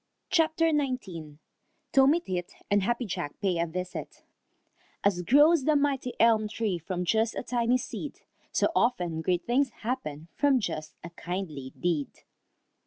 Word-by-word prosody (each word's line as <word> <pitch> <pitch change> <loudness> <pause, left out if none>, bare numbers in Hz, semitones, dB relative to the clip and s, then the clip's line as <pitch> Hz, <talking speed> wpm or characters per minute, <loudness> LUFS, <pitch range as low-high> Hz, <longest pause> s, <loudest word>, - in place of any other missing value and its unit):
CHAPTER 325 -1 +3
XIX 205 - -2 0.5
TOMMY 275 +5 +5
TIT 180 - -4 0.2
AND 205 0 +4
HAPPY 240 +5 0
JACK 175 -7 -5
PAY 185 -4 0
A 170 - +1
VISIT 180 +2 -6 0.8
As 195 -3 +2
grows 290 - +5
the 310 - +4
mighty 280 -3 +1
elm 220 -1 +4
tree, 210 -4 -2
From 180 +2 -3
just 220 +4 +1
a - - -3
tiny 240 0 +1
seed, - - -6 0.3
So - - +2
often 175 -9 +1
great 180 +1 0
things 260 +3 +2
happen 165 - -3
From 280 -3 +3
just 155 -8 -4
a 170 - -8
kindly 170 -7 -5
deed. 165 -5 0
210 Hz, 145 wpm, -28 LUFS, 175-260 Hz, 0.8 s, TOMMY